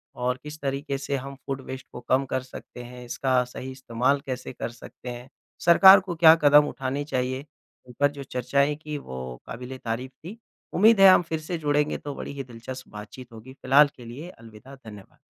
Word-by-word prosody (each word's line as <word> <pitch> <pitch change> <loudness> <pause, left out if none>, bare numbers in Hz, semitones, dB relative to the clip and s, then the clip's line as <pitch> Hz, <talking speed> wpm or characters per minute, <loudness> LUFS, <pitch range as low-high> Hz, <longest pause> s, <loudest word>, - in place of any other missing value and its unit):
और 125 +1 -2
इस 150 +1 -8
तरीके 140 0 -2
से 140 +1 -3
हम 135 +1 -7
फूड 135 -1 -4
वेस्ट 130 0 -7
को - - -8
कम 130 +2 +1
कर 130 - -1
सकते 125 -1 -11
हैं। 125 0 -11
इसका 130 +1 +1
सही 130 +1 -8
इस्तेमाल 130 +1 0
कैसे 130 -1 -5
कर - - -5
सकते 120 +1 -11
हैं। 120 +1 -8 0.4
सरकार 190 +3 +9
को 185 -2 -6
क्या 160 -1 +8
कदम 145 0 +7
उठाने 135 +1 -3
चाहिए, 130 -1 -2 0.4
ऊपर 145 +4 +1
जो 140 -1 -8
चर्चाएँ 140 +3 0
की 150 0 -6
वो 65 - -8
काबीले 125 +2 -8
तारीफ 125 +2 -4
थी। 195 +8 -9 0.4
उम्मीद 215 +2 +5
है 195 - +10
हम 185 - +6
फिर 160 -2 -4
से 165 +3 -4
जुड़ेंगे 150 -1 0
तो 145 - -7
बड़ी - - -6
ही 140 -1 -5
दिलचस्प 125 +1 -9
बात-चीत 105 +4 -11
होगी। 115 +4 -12
फ़िलहाल 140 +2 +5
के 120 - -12
लिए 135 +9 -8
अलविदा। 115 -1 -14
धन्यवाद। 105 -7 -14
130 Hz, 195 wpm, -25 LUFS, 125-145 Hz, 0.4 s, है